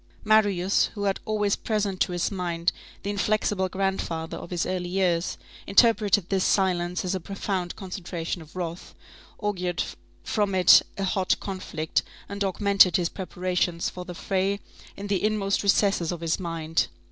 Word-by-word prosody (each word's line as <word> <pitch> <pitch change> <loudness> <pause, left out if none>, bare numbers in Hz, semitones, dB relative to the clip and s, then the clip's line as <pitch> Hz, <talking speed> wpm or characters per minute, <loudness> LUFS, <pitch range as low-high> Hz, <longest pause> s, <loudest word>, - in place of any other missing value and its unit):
Marius, 205 -4 +3
who 205 - -3
had 195 -1 0
always 210 -2 +1
present 205 -4 -2
to - - +2
his 175 +2 -1
mind 175 -2 -1 0.3
the 205 - -1
inflexible 205 -2 0
grandfather 185 -4 -2
of - - -8
his 175 -2 -1
early 180 -1 -2
years, 180 -2 0 0.3
interpreted 205 -3 +4
this 190 -2 +1
silence 180 -2 +1
as 180 - -1
a 190 - -1
profound 190 -1 -3
concentration 180 -3 -5
of 155 +1 -15
wrath, 175 -1 -5 0.4
augured 180 -4 -1 0.4
from 205 -3 0
it 185 -1 +8 0.2
a 195 - -2
hot 190 -1 +1
conflict, 170 -5 -2 0.3
and 200 0 -3
augmented 195 -1 +4
his 175 -2 0
preparations 180 -2 -2
for 180 - -7
the 180 -1 -8
fray 195 +2 0 0.4
in 200 - -6
the 200 -2 0
inmost 210 -2 +1
recesses 195 -4 +2
of 175 -2 -5
his 165 +2 0
mind. 165 -2 -1
190 Hz, 155 wpm, -26 LUFS, 175-200 Hz, 0.4 s, it